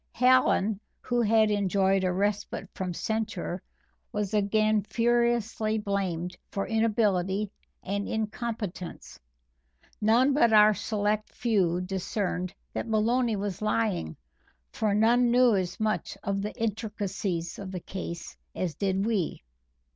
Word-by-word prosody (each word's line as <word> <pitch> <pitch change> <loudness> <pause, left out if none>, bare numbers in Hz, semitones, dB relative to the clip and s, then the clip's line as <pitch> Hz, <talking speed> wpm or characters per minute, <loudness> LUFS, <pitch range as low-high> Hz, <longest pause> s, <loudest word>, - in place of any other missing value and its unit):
Hallen, 245 -5 +3 0.2
who 245 -1 0
had 220 -1 +4
enjoyed 195 -1 +2
a 185 - +2
respite 200 +1 -1
from 185 -1 -3
censure, 215 -2 -3 0.5
was 210 -1 -2
again 215 +1 +2
furiously 230 -1 +1
blamed 190 -4 -2
for 195 - -2
inability 210 -3 +1 0.3
and 200 +1 -2
incompetence. 215 -4 -4 0.8
None 240 +6 +4
but 235 -5 +4
our 210 0 +7
select 210 0 -1
few 185 -7 +1
discerned 185 -1 -2 0.2
that - - -3
Maloney 230 +2 +2
was 200 -2 -4
lying, 110 - 0 0.5
for 210 -2 0
none 240 +3 +4
knew 245 -2 +5
as 185 -2 -2
much 215 -1 -1
of 195 0 -1
the 210 +1 -5
intricacies 205 -6 -3
of 195 -2 -6
the 185 - -4
case 170 -1 -6 0.2
as 180 -4 -2
did 195 +3 0
we. 210 - -1
210 Hz, 120 wpm, -28 LUFS, 190-220 Hz, 0.8 s, our